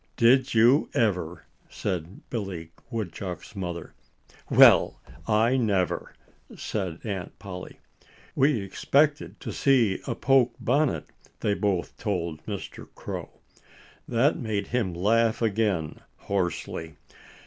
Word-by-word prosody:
"Did 130 +2 +4
you 120 +6 +5
ever?" 90 -7 0 0.2
said 90 -1 -4
Billy 95 -8 -4 0.2
Woodchuck's 95 -4 -5
mother. 90 -3 -5 0.6
"Well, - - +6 0.3
I 115 +4 +3
never!" 100 -7 0 0.4
said 95 -6 -3
Aunt 100 -5 -5
Polly. 90 -3 -8 0.6
"We 135 -4 +3
expected 145 +9 +1
to - - -5
see 120 -8 +3
a - - -1
poke 130 -3 +3
bonnet," 140 +3 +1 0.4
they 105 - +1
both 100 -4 -1
told 85 -7 -2
Mr. 100 -3 -6
Crow. - - -6 0.8
That 125 +4 +2
made 105 -4 -2
him 110 -8 -1
laugh 110 +5 +2
again 105 -8 0 0.2
hoarsely. 90 -4 -3
105 Hz, 105 wpm, -26 LUFS, 90-120 Hz, 0.8 s, Well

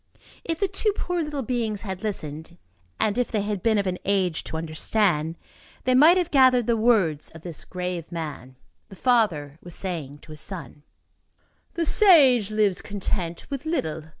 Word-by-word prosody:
If 330 -1 -3
the 395 - +2
two 395 +3 0
poor 355 -3 -2
little 300 -3 -3
beings 225 -4 -2
had 190 -3 -5
listened 160 -5 -6 0.4
and 215 +2 +1
if 245 - 0
they 215 - -1
had 205 -2 -3
been 220 +1 +2
of 200 - 0
an 180 -1 -2
age 190 -4 0
to 160 - -4
understand, 165 0 0 0.5
they 255 - +2
might 310 +8 +7
have 355 -2 -1
gathered 255 -4 +5
the 235 - +2
words 210 -10 +2
of 160 - -12
this 170 -4 -7
grave 180 -2 -5
man. 150 -6 -6 0.3
The 195 - -11
father 180 - +1
was 175 -2 -4
saying 160 -7 -2
to - - -13
his 155 - -3
son: 155 -7 -4 0.9
"The 335 -1 0
sage 280 - +6
lives 210 -3 +1
content 185 -4 -4
with 275 0 -4
little. 160 - -2
200 Hz, 175 wpm, -24 LUFS, 165-250 Hz, 0.9 s, might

